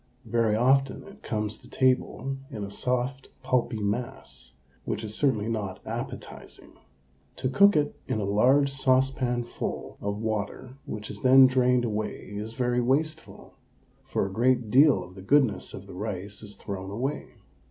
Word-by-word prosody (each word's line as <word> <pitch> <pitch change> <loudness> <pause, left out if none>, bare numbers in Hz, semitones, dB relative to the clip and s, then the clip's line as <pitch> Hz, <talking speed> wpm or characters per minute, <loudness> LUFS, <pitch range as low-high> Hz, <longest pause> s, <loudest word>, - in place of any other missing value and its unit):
Very 115 -2 +1
often 135 +3 +2
it 200 +2 -14
comes 105 -1 -2
to 125 - -17
table 130 +1 +1
in 110 -7 -6
a 100 - -6
soft, 125 +3 -2
pulpy 125 -3 +1
mass, 115 +4 -4 0.3
which - - -3
is 105 -1 -5
certainly 110 -5 +1
not 105 -5 -3
appetising. - - -7 0.6
To 130 - -1
cook 200 +9 +5
it 150 -1 +1
in 110 - -1
a - - -1
large 130 +8 +4
saucepanful 130 -2 0
of 100 0 -2
water 110 +3 -3
which 105 -1 -5
is 100 - -9
then 130 +1 +8
drained 125 -1 +3
away 110 -2 -4
is 110 +2 -5
very 125 0 +1
wasteful, 155 +6 -2 0.5
for - - -1
a 95 - -5
great 120 0 +2
deal 135 -6 +6
of 90 0 -13
the 95 - -11
goodness 130 +2 +2
of - - -9
the - - -11
rice 100 0 -5
is 105 -1 -7
thrown 95 -1 -6
away. 130 +8 -4
120 Hz, 155 wpm, -27 LUFS, 105-130 Hz, 0.6 s, then